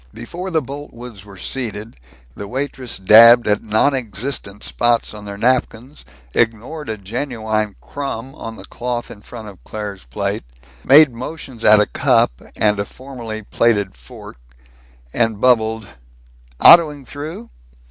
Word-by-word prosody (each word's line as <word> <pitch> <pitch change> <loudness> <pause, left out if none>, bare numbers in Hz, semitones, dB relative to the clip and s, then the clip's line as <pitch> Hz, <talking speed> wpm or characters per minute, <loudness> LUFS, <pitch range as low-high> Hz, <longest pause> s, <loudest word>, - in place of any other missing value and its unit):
Before 170 +11 -6
the 160 -3 0
Boltwoods 125 -7 -9
were 100 -2 -13
seated, 110 -2 -4 0.4
the 100 - -7
waitress 130 0 -4
dabbed 115 +5 +7
at 105 0 +2
non 110 +6 +2
existent 110 -3 -4
spots 120 -2 +1
on 105 -1 -10
their 100 0 -7
napkins, 125 +3 -1 0.3
ignored 120 +6 -1
a 110 - -3
genuine 110 -1 -3
crumb 135 -3 -6
on 115 -3 -8
the - - -11
cloth 120 -1 -4
in 100 - -12
front 110 0 -10
of 95 - -16
Claire's 105 -7 -7
plate, - - -3 0.4
made 145 +1 +7
motions 130 -1 -8
at 105 0 +7
a 105 - +4
cup - - +2 0.2
and 105 -1 +1
a 100 - -1
formerly 115 -4 -8
plated 100 - +1
fork, - - -13 0.8
and 115 -3 0
bubbled, 110 -2 +2 0.7
"Autoing 150 -5 +7
through?" 145 -2 -8
115 Hz, 135 wpm, -19 LUFS, 105-130 Hz, 0.8 s, dabbed